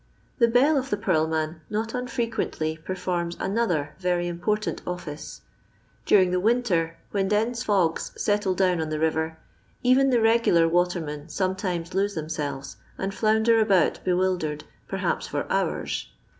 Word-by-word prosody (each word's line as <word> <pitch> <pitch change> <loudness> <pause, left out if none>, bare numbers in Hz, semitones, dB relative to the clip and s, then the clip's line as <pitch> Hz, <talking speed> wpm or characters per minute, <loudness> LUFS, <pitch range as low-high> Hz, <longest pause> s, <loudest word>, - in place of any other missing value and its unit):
The 235 - +6
bell 265 +6 +4
of 265 +1 -5
the 205 - 0
purl 160 -5 +1
man 160 0 -2
not 220 +1 -2
unfreqnently 230 -10 -2
per 185 - -3
forms 175 -2 -2
another 180 -8 0
very 180 -1 0
important 210 +5 -2
office. 160 -4 -6 0.7
Daring 185 -3 +5
the 180 - +1
winter, 190 -7 +1
when 195 -2 0
dense 225 +3 0
fogs 185 -6 +1
settle 205 -3 +1
down 180 -3 +2
on 155 - -3
the 155 - -2
river, 160 0 0 0.5
even 260 +2 +5
the 250 - +3
regulor 225 -7 +4
watermen 165 -3 -1
sometimes 185 -1 -2
lose 200 +2 0
them 155 -1 -4
selves, 145 -4 -4 0.2
and 195 +1 -3
flounder 220 +2 +3
about 195 -6 +3
bewildered 180 -5 0 0.2
perhaps - - -2
for - - -2
hours. - - -1
185 Hz, 145 wpm, -25 LUFS, 160-215 Hz, 0.7 s, The